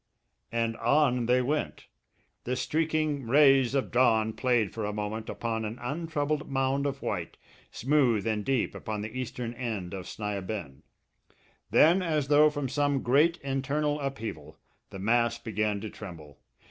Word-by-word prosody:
And 115 -1 0
on 125 -1 +2
they 125 +1 +3
went. 150 +4 -2 0.6
The 125 - -1
streaking 155 -1 -1
rays 135 -1 +5
of 135 - 0
dawn 110 -3 +3
played 120 -6 +1
for 110 - -4
a 105 - -1
moment 105 +1 -4
upon 115 -1 -3
an 110 +2 -4
untroubled 150 +2 -2
mound 135 +1 0
of 140 0 -5
white, - - -3 0.3
smooth 125 -6 +2
and 110 -2 -1
deep 130 +2 0
upon 105 -1 -5
the 110 +3 -7
eastern 125 -2 -4
end 110 -7 -4
of 95 -2 -6
Sni 105 -2 -3
a - - -7
bend. 90 -9 -6 0.9
Then, 170 +5 +5
as 155 -5 -1
though 150 +1 +6
from 145 -2 -3
some 145 0 0
great 150 +7 +4
internal 140 +2 -1
upheaval, 115 - -5 0.3
the - - -8
mass 115 +3 +2
began 105 -2 -1
to 110 - -5
tremble. 80 -8 -10
125 Hz, 155 wpm, -28 LUFS, 110-145 Hz, 0.9 s, though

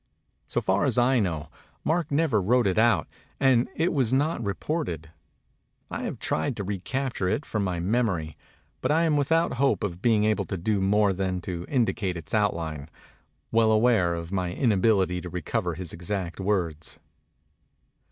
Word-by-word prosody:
So - - -1
far - - +1
as - - 0
I 125 +1 +4
know, 80 -7 -2 0.3
Mark 165 -1 0
never 140 -7 +2
wrote 120 +5 +3
it 95 +1 +2
out; 115 +1 +3 0.3
and 125 -2 +3
it 165 +2 +1
was 130 -7 +1
not 140 -1 +1
reported. 100 - -3 0.8
I - - -3
have - - -4
tried 140 - -1
to 100 - -3
recapture 100 +2 -2
it 145 - -1
from 105 -2 -2
my 90 -3 -2
memory; 90 -5 0 0.5
but - - 0
I 160 +2 +3
am 160 -2 +2
without 150 -1 +1
hope 140 - +2
of 90 -3 -3
being 110 -3 +3
able 110 0 +1
to 95 - -4
do 100 +3 0
more 100 +1 +3
than 95 -1 -2
to 85 -1 -5
indicate 115 -8 0
its 80 - -9
outline, 80 -8 -1 0.6
well 110 -1 +4
aware 110 -6 +3
of 85 +1 -6
my 95 -2 -1
in 115 +7 +1
ability 95 -3 +2
to 90 - -7
recover 90 +1 -2
his 90 -1 -6
exact 90 0 -4
words. 90 -6 -2
105 Hz, 170 wpm, -26 LUFS, 90-125 Hz, 0.8 s, I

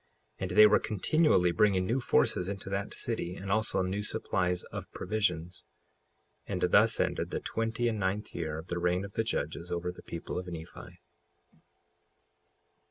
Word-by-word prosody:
55:34 - - -20
And - - -4
they 105 - +11
were 105 0 +6
continually 105 - +2
bringing 95 +1 +3
new 125 +7 0
forces 90 -5 +2
into 95 -1 -5
that 100 +1 -3
city, 90 -7 -3
and 95 0 -5
also 110 -2 +1
new 95 +3 -2
supplies 90 -3 -1
of - - -7
provisions. 90 -5 -1 0.8
55:35 - - -7
And - - +2
thus - - +5
ended - - 0
the - - -2
twenty 115 +1 -1
and 110 -2 -1
ninth 100 +2 -2
year 80 -2 -3
of 80 - -7
the 85 - -2
reign 90 +2 +1
of 100 - -10
the 110 - 0
judges 85 -5 -3
over 85 +1 -2
the 90 - -13
people 85 +1 -5
of 90 - -7
Nephi. 85 0 -9
95 Hz, 170 wpm, -30 LUFS, 90-105 Hz, 0.8 s, they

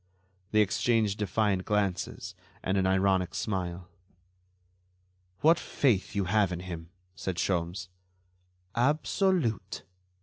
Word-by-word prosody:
They 110 0 +4
exchanged 105 0 +1
defiant 100 -1 +1
glances 100 -3 -1 0.3
and 95 - 0
an 95 -1 +2
ironic 95 -1 +2
smile. 90 -3 -3 1.5
"What 160 +2 +5
faith 115 -6 +1
you 100 - +1
have 100 +1 +2
in 90 0 -4
him!" 85 -3 -7 0.3
said 95 -1 -3
Sholmes. 90 +1 -1 0.9
"Absolute." 140 - +1
100 Hz, 100 wpm, -29 LUFS, 90-110 Hz, 1.5 s, What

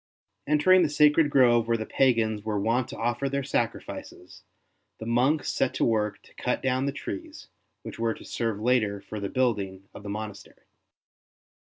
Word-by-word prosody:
Entering 165 +6 +5
the 165 - +2
sacred 150 +1 +4
grove 120 -5 +4
where 115 0 +2
the 110 - -4
pagans 115 -5 +1
were 105 -1 -2
wont 115 +4 +1
to - - -8
offer 120 +4 -1
their 140 0 -2
sacrifices, 115 -7 -4 0.6
the 110 - -8
monks 130 +6 +1
set 125 - 0
to - - +1
work 105 -2 0
to - - -20
cut - - -2
down 130 +1 +1
the - - 0
trees, 100 -8 -7 0.3
which - - -8
w^ere 115 -1 -1
to - - -13
serve 115 -3 -2
later 110 -3 +1
for 105 +2 -7
the 100 -1 -3
building 100 -7 -1
of - - -10
the 105 - -8
monastery. 105 0 -7
115 Hz, 175 wpm, -27 LUFS, 105-135 Hz, 0.6 s, Entering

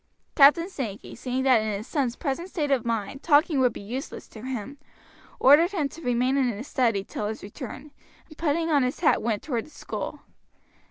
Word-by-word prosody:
Captain 300 +4 +6
Sankey 235 - -6
seeing 255 +2 -3
that 255 -4 +5
in 215 0 -2
his 210 - -7
son's 255 -3 -1
present 335 +4 -3
state 305 -7 -2
of 260 -4 +2
mind 230 +3 -2
talking 300 -1 +3
would 250 -2 +4
be - - -9
useless 250 +8 -6
to 220 - -11
him, 260 +2 -5 0.6
ordered 320 +8 +6
him 315 -7 0
to 330 - -12
remain 250 0 +1
in 270 - +3
his 240 +3 -4
study 230 -7 +1
till 205 +1 -4
his 220 +1 -5
return, 255 +7 -8 0.4
and 310 - -14
putting 325 +1 0
on 290 -2 +4
his 250 +4 -2
hat 340 - +3
went 220 -3 -1
toward 245 -5 -3
the - - -16
school. - - -6
265 Hz, 200 wpm, -26 LUFS, 230-300 Hz, 0.6 s, Captain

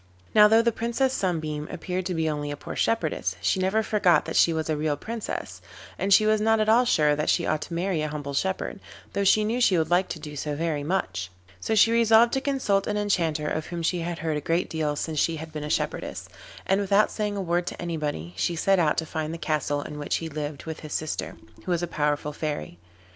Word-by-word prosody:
Now 210 -1 +8
though 225 +2 +5
the 235 - +3
Princess 235 +4 0
Sunbeam 155 - -2
appeared 180 +1 -3
to 180 - -2
be 160 -1 0
only 145 -1 -2
a 145 - -4
poor - - -7
shepherdess, 155 - 0
she 95 - +1
never 190 +4 +1
forgot 185 -7 +3
that - - -5
she 170 - +5
was 160 -1 -2
a 155 - 0
real 150 -1 -1
Princess, 225 +7 -5 0.3
and 195 - -2
she 215 +2 +7
was 215 0 +3
not 225 +1 +3
at 215 - +1
all 235 +3 +5
sure 150 -9 +3
that 150 - -1
she - - +2
ought 155 -1 0
to 170 - -5
marry 175 -2 0
a 155 - -1
humble 145 -2 -5
shepherd, 190 +6 -2 0.3
though 200 - 0
she 210 +2 +4
knew 230 +4 -1
she 190 -7 +4
would 160 0 0
like 180 +2 +3
to 160 - -6
do 150 -1 -8
so 145 +1 -3
very 155 -1 -1
much. 95 - -2 0.3
So 220 - -1
she 220 +2 +6
resolved 230 0 +5
to 270 - +1
consult 260 -9 0
an 210 - -1
Enchanter 165 -7 0
of 155 +1 -2
whom 170 -1 -5
she 175 +2 +1
had 170 0 -3
heard 160 -1 -2
a - - -3
great 165 +4 0
deal 155 -2 -1
since 155 +1 -2
she 165 - +1
had 160 0 -8
been 150 -1 -4
a 150 - -4
shepherdess, - - -2 0.4
and 195 +1 +2
without 200 +1 +3
saying 210 -1 -2
a - - -1
word 175 0 0
to - - -5
anybody 150 - -3
she 170 - 0
set 195 +3 +2
out 155 -3 +2
to 160 - 0
find 155 -1 -3
the 165 - -5
castle 145 -2 -1
in 150 -1 -7
which 145 - -1
he 165 - -3
lived 150 -1 -5
with 160 -1 -6
his 155 -1 -8
sister, 155 -1 -3 0.3
who 185 - -2
was 175 0 0
a - - -1
powerful 150 -1 -1
Fairy. 145 - -4
165 Hz, 245 wpm, -26 LUFS, 150-200 Hz, 0.4 s, Now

